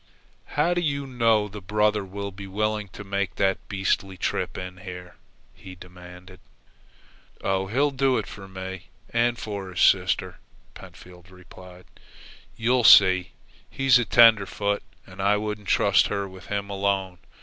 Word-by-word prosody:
"How 175 - +3
do 175 - -1
you 140 -4 -2
know 115 -5 +1
the 105 0 -10
brother 105 +2 +1
will 100 +1 -6
be 100 +1 -10
willing 105 +1 -2
to 105 - -10
make 100 -1 -3
that 95 -1 +1
beastly 95 -1 -1
trip - - -3
in 90 0 -7
here?" 90 -2 -10 0.4
he 95 -1 -12
demanded. 90 0 -14 1.0
"Oh, 95 0 -1
he'll 140 +8 +1
do 135 -1 +1
it - - -2
for 95 -1 -11
me 95 -2 -8 0.2
and 120 +1 +1
for 100 -4 -6
his 90 - -7
sister," - - +2 0.3
Pentfield 90 0 -15
replied. 90 -1 -15 0.7
"You 120 +2 +1
see, 95 -4 +6 0.4
he's 135 -2 +3
tenderfoot, 100 -3 +4 0.2
and 90 +1 -10
I 100 +1 +3
wouldn't 105 -1 -5
trust - - +3
her 100 -1 -3
with 95 0 -13
him 100 0 -4
alone. 95 -2 -2
100 Hz, 145 wpm, -24 LUFS, 95-105 Hz, 1.0 s, see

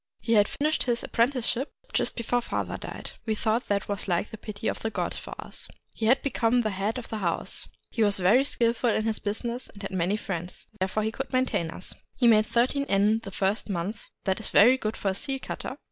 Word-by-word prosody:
He 230 +2 0
had 205 -2 +6
finished 305 +2 0
his 240 -2 +1
apprenticeship 250 +2 +1 0.2
just - - 0
before 245 +1 0
father - - -2
died; - - -7 0.2
we 220 - +1
thought 220 +3 0
that 200 -1 0
was 200 -1 -1
like 175 +2 0
the 220 - -7
pity 215 0 -5
of - - -1
the 225 - -2
gods - - -2
for - - -8
us. - - -8 0.3
He 220 - -1
had 255 +4 +4
become 245 -3 +2
the 215 -2 0
head 200 +5 -1
of 245 - -7
the 220 - -3
house. 170 -4 -2 0.2
He 230 - -1
was 205 -1 +4
very 200 +8 +5
skillful 235 -2 +1
in 215 - +2
his 220 -1 0
business, 235 +4 -3
and 200 - -11
had 195 - -4
many 190 +2 +1
friends: 180 -4 -5
therefore 190 +3 0
he 220 - 0
could 270 +3 -5
maintain 255 -10 +1
us. 180 - -4 0.2
He 245 - +4
made 215 -2 +6
thirteen 260 +4 +1
yen 205 +3 +4
the 225 - -8
first 195 +3 0
month; 195 +3 -3
— - - -56
that 190 -1 +1
is 220 - -4
very 240 +6 +7
good 220 -4 -3
for 200 - 0
a - - 0
seal 270 +6 -1
cutter. - - -5
220 Hz, 230 wpm, -27 LUFS, 200-240 Hz, 0.3 s, very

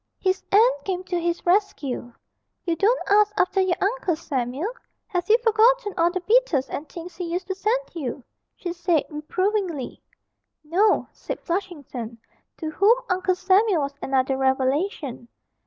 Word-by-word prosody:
His 375 0 0
aunt - - +4
came 370 -2 -3
to 360 -1 -2
his 340 0 -2
rescue. 345 - 0 0.5
'You 340 -2 +1
don't 440 +9 +3
ask 420 +1 +5
after 385 +1 +2
your 375 -2 +2
Uncle 395 -4 0
Samuel 280 - -3 0.3
have 360 -1 -3
you 445 - +7
forgotten 455 -1 +4
all 340 -1 +3
the 370 +1 -3
beetles 425 - +2
and 300 - -5
things 345 +1 -9
he 360 - -3
used 360 +2 -2
to - - 0
send 445 +6 -1
you?' 275 -6 -5 0.3
she 350 -2 -5
said 345 -3 +1
reprovingly. 350 - -2 0.6
'No,' 375 +8 +2
said - - -6
Flushington, 290 - -4 0.4
to 315 -2 -4
whom 415 +9 +4
Uncle 370 0 +1
Samuel 380 -1 +3
was 280 0 -3
another 265 0 +1
revelation. 265 - 0
360 Hz, 150 wpm, -24 LUFS, 300-405 Hz, 0.6 s, you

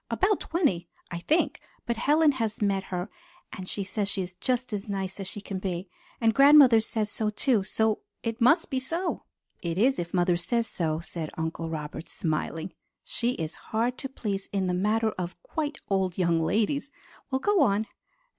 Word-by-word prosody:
About 405 0 +2
twenty, 200 - 0 0.2
I 170 - -3
think, 310 - +1 0.2
but 235 - 0
Helen 295 +6 +4
has 225 -5 -2
met 195 -2 +1
her, 180 +2 -4 0.4
and 185 -2 -6
she 200 - -2
says 200 +1 -2
she 195 - -1
is 180 +1 -7
just 250 +3 -1
as 205 0 -3
nice 195 -1 -3
as 195 - -4
she 205 - -7
can 195 -2 -4
be. 185 -1 -3 0.3
And 225 -1 +3
grandmother 275 -4 +8
says 215 -1 -2
so 215 0 -1
too; 215 0 +2
so 220 +2 +1 0.2
it 230 0 -3
must 300 +8 +4
be 265 - +1
so." 335 +7 -2 0.4
"It 170 -1 -2
is 255 +4 +3
if 170 -1 -3
mother 175 -1 +3
says 230 +7 0
so," 160 -6 -2
said 165 -2 -5
Uncle 160 0 -3
Robert, 155 0 -5
smiling. 160 +1 -2 0.3
"She 240 +1 -1
is 160 -6 -4 0.2
hard 235 +3 0
to 270 - -4
please 205 -7 -3
in 195 -2 0
the 180 - 0
matter 215 +4 +2
of 175 0 -4
'quite 310 - -3
old 190 -3 0
young 170 -3 +2
ladies.' 225 - +1 0.4
Well, 265 - +1
go 410 +4 +3
on." 215 -4 +3
210 Hz, 185 wpm, -28 LUFS, 180-250 Hz, 0.4 s, grandmother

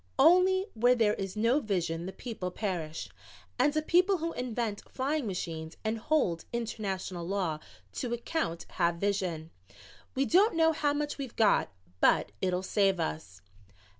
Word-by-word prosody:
"Only 365 +6 +5
'where 245 +3 +4
there 220 -3 +3
is 195 -1 -4
no 230 +6 +3
vision 175 - -2
the - - -4
people 190 -3 -5
perish,' 170 - -4 0.5
and 295 +1 +3
a 310 - +1
people 365 +4 +4
who 330 0 -3
invent 235 -4 -3
flying 275 0 -1
machines 165 -4 -5
and 220 +1 -1
hold 215 - +1
international 195 -6 -3
law 180 -6 -1 0.3
to 240 - -3
account 235 - -2 0.2
have 170 0 +3
vision. 175 -4 -2 0.6
We 270 +1 +2
don't 385 - +4
know 325 0 +4
how 290 -2 +1
much 295 0 -3
we've 265 -4 -6
got, 215 -3 +3 0.3
but 100 - +3
it'll 185 0 0
save 195 -1 +2
us." 85 - -4
215 Hz, 150 wpm, -30 LUFS, 180-285 Hz, 0.6 s, Only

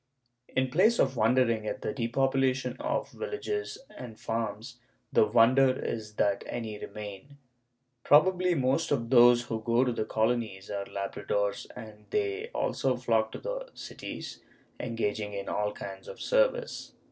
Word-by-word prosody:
In 130 -1 -1
place 215 - +4
of 135 0 +2
wondering 115 -1 +2
at - - -4
the - - -2
depopulation 130 +1 +1
of - - -2
villages 420 -2 -4 0.2
and 115 -3 -9
farms, 115 +2 -4 0.3
the 110 - +5
wonder 120 +5 +5
is 110 -2 -4
that 100 -1 +1
any 110 -3 -5
remain. 105 +6 -8 0.7
Probably 180 +4 +4
most 135 +3 +1
of 120 -4 -1
those 120 -1 +7
who 115 -2 -4
go 115 +2 +3
to 125 - +1
the 110 -2 -2
Colonies 110 -4 -1
are 100 -1 -3
labradores 100 +1 -2
and 105 -1 -11
they 415 +2 -1
also 130 - 0
flock 115 -3 +1
to - - -4
the - - -5
cities, - - -7 0.4
engaging 110 -3 -2
in 100 -1 -5
all 105 0 -1
kinds 95 -2 -8
of - - -9
service. - - 0
120 Hz, 145 wpm, -29 LUFS, 110-135 Hz, 0.7 s, those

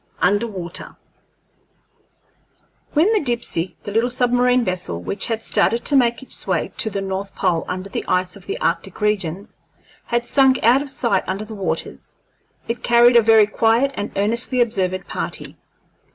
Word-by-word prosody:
UNDER 205 +5 +2
WATER 180 -5 -7 2.0
When 340 +9 +3
the 430 - +3
Dipsey, 230 - -2
the 205 - -6
little 225 +4 +1
submarine 245 0 +2
vessel 180 - -2
which 195 - -3
had 225 -1 -2
started 230 +1 +1
to 285 - +3
make 240 -1 +2
its - - -6
way - - -1
to 220 - +2
the 200 -1 -4
north 195 +1 -5
pole 175 -4 0
under 185 +1 -4
the - - -4
ice 180 0 0
of - - -14
the 405 +5 -4
arctic - - -2
regions, 200 -3 -2 0.5
had 240 0 -1
sunk 265 +1 +4
out 245 +4 +5
of 285 - -5
sight 235 -7 0
under 195 +3 -3
the 220 - -9
waters, 200 -3 -5 0.5
it 230 +1 -3
carried 240 +1 +5
a 235 - +8
very 220 -1 +5
quiet 225 +5 +2
and 205 -2 -5
earnestly 235 +5 +1
observant 190 -6 0
party. - - -5
225 Hz, 165 wpm, -20 LUFS, 195-245 Hz, 2.0 s, a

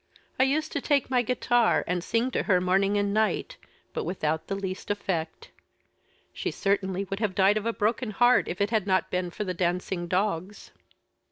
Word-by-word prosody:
I 260 - +6
used 305 +3 0
to 285 - -2
take 280 -2 +1
my 250 -1 +4
guitar, 240 -1 +2
and 180 -1 -2
sing 235 +6 0
to - - 0
her 185 -2 +5
morning 195 +3 +2
and 200 0 0
night, 215 0 0 0.4
but 470 - -2
without 160 - -2
the 195 - -2
least 190 -1 -5
effect. 180 -6 -3 0.8
She - - -3
certainly 195 -1 -1
would 195 - -2
have 210 -4 -1
died 195 +2 +4
of 215 +1 -2
a - - +2
broken 225 +2 -1
heart, 245 +4 +4
if 180 - -4
it 200 +2 +1
had 215 -4 +1
not 185 -1 +1
been 180 -1 -1
for 195 - -4
the 185 -2 -3
dancing 175 0 -1
dogs." 185 +1 -2
200 Hz, 190 wpm, -27 LUFS, 185-230 Hz, 0.8 s, I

